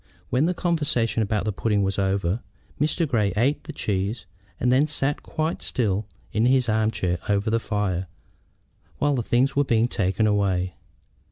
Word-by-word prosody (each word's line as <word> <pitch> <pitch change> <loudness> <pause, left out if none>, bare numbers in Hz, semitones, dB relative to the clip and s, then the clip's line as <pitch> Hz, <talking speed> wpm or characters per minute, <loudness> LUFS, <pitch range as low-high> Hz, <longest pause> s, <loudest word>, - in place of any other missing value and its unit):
When 130 +6 +3
the 180 - 0
conversation 150 -11 0
about 105 0 0
the 105 - 0
pudding 105 0 +1
was 95 +1 -1
over 95 +1 0 0.4
Mr. 155 +3 +1
Grey 105 -8 +1
ate 135 +7 +2
his - - -7
cheese, 100 +1 -2 0.3
and 125 - +2
then 135 +4 +4
sat 145 -1 -1
quite 160 0 -2
still 105 -4 -1 0.3
in 110 +3 +3
his 130 -1 +3
arm 110 0 +2
chair 90 -5 -1
over 105 +2 +1
the 115 - +2
fire 95 -5 -1 0.9
while 145 0 +2
the 130 - 0
things 125 +4 +1
were 140 - +4
being 115 -3 +2
taken 100 -1 0
away. 95 -4 +1
110 Hz, 170 wpm, -24 LUFS, 100-135 Hz, 0.9 s, then